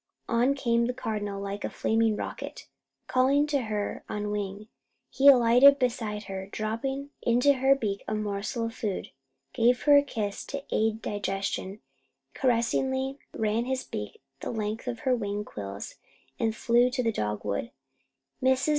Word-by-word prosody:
On 245 +4 +2
came 235 -3 +1
the 250 - -2
Cardinal 205 -5 -3
like 200 +1 -5
a - - -1
flaming 225 -1 +1
rocket, - - -6 0.4
calling 270 +3 +3
to 285 -5 0
her 210 -1 -3
on 210 0 -3
wing. 205 0 -4 0.4
He 275 - +3
alighted 255 +1 +8
beside 225 -5 -1
her, 190 -1 -6
dropped 220 +5 -3 0.3
into 245 +4 +4
her 265 +1 +4
beak 205 -7 -3
a 215 - -1
morsel 215 +3 -2
of 230 - -4
food, 210 -4 -4 0.4
gave 245 +2 +3
her 290 -1 +7
a - - +7
kiss 210 -7 -3
to 280 0 -5
aid 220 0 +1
digestion, 195 0 -3 0.5
caressingly 265 +2 0
ran 220 +2 0
his 260 0 -2
beak 105 +5 -7 0.2
the - - -5
length 220 +1 -3
of 240 -2 -3
her 260 -3 +2
wing 205 -2 -3
quills, 100 - -7 0.4
and 225 -1 0
flew 240 +2 +3
to 250 0 -1
the 230 - +2
dogwood. 105 - -2 0.7
Mrs. 260 +3 +2
225 Hz, 155 wpm, -28 LUFS, 205-255 Hz, 0.7 s, alighted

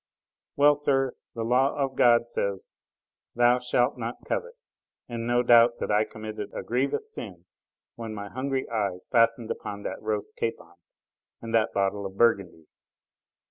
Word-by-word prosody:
Well, 145 +1 +6
sir, 135 -3 0 0.2
the 115 - -3
law 125 +4 +2
of 135 -2 -1
God 120 -1 +5
says: 100 -4 -3 0.6
"Thou 120 +1 +4
shalt 125 +1 +1
not 115 +1 -5
covet!" 480 0 -3 0.5
and 115 -1 -4
no 120 0 +2
doubt 120 0 +6
that - - -3
I 105 +1 +3
committed 110 -2 -7
a - - -4
grievous 140 - -1
sin - - -8 0.5
when 115 -2 -6
my 100 -1 -6
hungry 130 +4 -3
eyes 100 -5 -2
fastened 115 -1 +3
upon 100 0 -6
that - - -5
roast 105 -1 -3
capon 115 - -4 0.7
and 115 0 -7
that 115 0 +3
bottle 100 0 0
of 95 0 -13
Burgundy. 100 -8 +2
115 Hz, 150 wpm, -27 LUFS, 105-125 Hz, 0.7 s, Well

